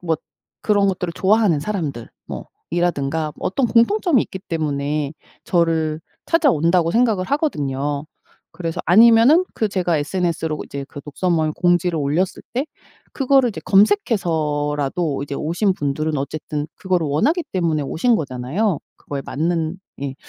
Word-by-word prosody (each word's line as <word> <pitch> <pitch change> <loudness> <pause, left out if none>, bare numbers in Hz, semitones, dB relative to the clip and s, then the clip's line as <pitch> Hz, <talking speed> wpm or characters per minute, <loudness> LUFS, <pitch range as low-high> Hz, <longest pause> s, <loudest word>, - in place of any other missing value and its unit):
뭐 165 -2 0 0.5
그런 205 -2 +3
것들을 180 -3 -1
좋아하는 200 -5 +3
사람들 155 - -4 0.2
뭐 - - -7 0.2
이라든가 160 -3 -1
어떤 240 +8 0
공통점이 265 - +3
있기 190 - -7
때문에 150 -2 -1 0.3
저를 160 -3 +1 0.2
찾아온다고 180 - +3
생각을 225 -6 +2
하거든요. 145 - -1 0.5
그래서 165 -2 -4
아니면은 230 - +6
그 220 - 0
제가 180 -4 0
SNS로 165 -1 -2
이제 140 -1 -6
그 145 - -9
독서 150 +6 -3
모임 155 -2 +1
공지를 175 -1 +1
올렸을 150 +6 -1
때 260 +5 -1 0.5
그거를 270 -2 +3
이제 - - -7
검색해서라도 160 - +1
이제 140 0 -5
오신 175 +6 0
분들은 150 +1 -1
어쨌든 150 +1 -4
그거를 180 -5 -1
원하기 295 - +1
때문에 165 -5 0
오신 225 - +1
거잖아요. 150 - -1 0.2
그거에 140 -1 -6
맞는 165 +2 -1 0.3
예. 135 -1 -3
170 Hz, 335 characters per minute, -20 LUFS, 150-205 Hz, 0.5 s, 아니면은